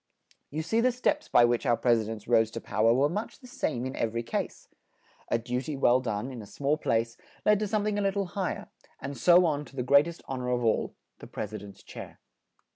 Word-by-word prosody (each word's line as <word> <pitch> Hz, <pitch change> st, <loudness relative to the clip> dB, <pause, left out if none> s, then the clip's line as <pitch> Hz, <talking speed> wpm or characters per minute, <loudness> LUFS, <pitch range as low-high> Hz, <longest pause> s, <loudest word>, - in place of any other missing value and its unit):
You 155 Hz, +2 st, -3 dB
see 225 Hz, +8 st, +1 dB
the 255 Hz, +1 st, +3 dB
steps 290 Hz, +5 st, 0 dB
by 120 Hz, -, +6 dB
which 120 Hz, 0 st, +1 dB
our 120 Hz, -4 st, +2 dB
Pres 120 Hz, -2 st, +3 dB
i -, -, -2 dB
dents 110 Hz, -2 st, -7 dB
rose 115 Hz, -2 st, +4 dB
to 115 Hz, -, -6 dB
pow 110 Hz, 0 st, 0 dB
er 115 Hz, -, +6 dB
were 135 Hz, +3 st, +4 dB
much 205 Hz, +8 st, -4 dB
the 255 Hz, -, -17 dB
same 140 Hz, -, -2 dB
in 130 Hz, -, -4 dB
ev 115 Hz, 0 st, -2 dB
er -, -, 0 dB
y -, -, 0 dB
case. 115 Hz, -, -4 dB, 0.6 s
A -, -, +2 dB
du 125 Hz, +2 st, -3 dB
ty 145 Hz, +3 st, -5 dB
well 130 Hz, -2 st, +4 dB
done 115 Hz, 0 st, -3 dB
in 125 Hz, -3 st, -7 dB
a 105 Hz, -, -11 dB
small 140 Hz, +7 st, 0 dB
place 115 Hz, -5 st, -1 dB, 0.3 s
led 210 Hz, -1 st, +5 dB
to 210 Hz, -, -1 dB
some 210 Hz, 0 st, 0 dB
thing 210 Hz, -1 st, 0 dB
a -, -, 0 dB
lit 195 Hz, 0 st, 0 dB
tle 200 Hz, -1 st, 0 dB
high 185 Hz, +1 st, -2 dB
er, -, -, -10 dB, 0.3 s
and 140 Hz, 0 st, -5 dB
so 175 Hz, +9 st, +6 dB
on 150 Hz, -3 st, 0 dB
to 140 Hz, -, -16 dB
the 125 Hz, -, -2 dB
great 140 Hz, +4 st, +5 dB
est 170 Hz, 0 st, -8 dB
hon 130 Hz, -1 st, -4 dB
or 125 Hz, -, -3 dB
of 125 Hz, -1 st, 0 dB
all 110 Hz, -, +1 dB, 0.2 s
the -, -, -10 dB
Pres 105 Hz, 0 st, -5 dB
i -, -, -3 dB
dent's 100 Hz, -1 st, -12 dB
chair. -, -, -10 dB
130 Hz, 270 wpm, -28 LUFS, 115-175 Hz, 0.6 s, by